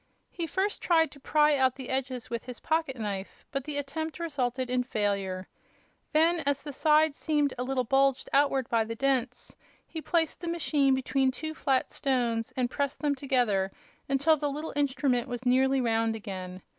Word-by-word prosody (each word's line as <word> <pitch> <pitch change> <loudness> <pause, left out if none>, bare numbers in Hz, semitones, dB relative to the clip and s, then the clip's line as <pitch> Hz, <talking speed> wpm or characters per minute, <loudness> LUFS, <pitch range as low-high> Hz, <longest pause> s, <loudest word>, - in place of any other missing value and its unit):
He 335 -2 -3
first 385 +6 -1
tried 325 -2 +3
to 280 - -14
pry 300 +1 +3
out 260 -2 +2
the 260 -2 -8
edges 260 -2 -2
with 235 -1 -4
his 250 -1 -7
pocket 315 -4 0
knife, 205 -4 -5
but 275 -2 -3
the 300 -1 -4
attempt 300 +3 -4
resulted 260 -6 -2
in 250 0 +1
failure, 200 -5 -2 0.6
Then, 330 +2 +3
as 285 -2 -1
the 290 -1 -6
sides 305 +1 +3
seemed 295 -3 0
a 250 - -3
little 260 0 0
bulged 270 +2 +2
outward 275 -2 +3
by 230 -1 +2
the 225 +1 -5
dents, 255 -1 -1 0.3
he 320 - -7
placed 330 0 0
the 345 - -5
machine 295 -5 +2
between 265 0 +1
two 315 +4 -4
flat 270 -4 0
stones 240 -4 0
and 250 -1 +2
pressed 280 -1 -2
them 290 -1 +2
together 245 -9 +1 0.4
until 280 +4 +3
the 290 0 -1
little 300 +3 -5
instrument 265 -3 +1
was 245 0 -5
nearly 265 +2 +3
round 225 -2 +1
again. 185 -4 -7
270 Hz, 180 wpm, -28 LUFS, 245-295 Hz, 0.6 s, tried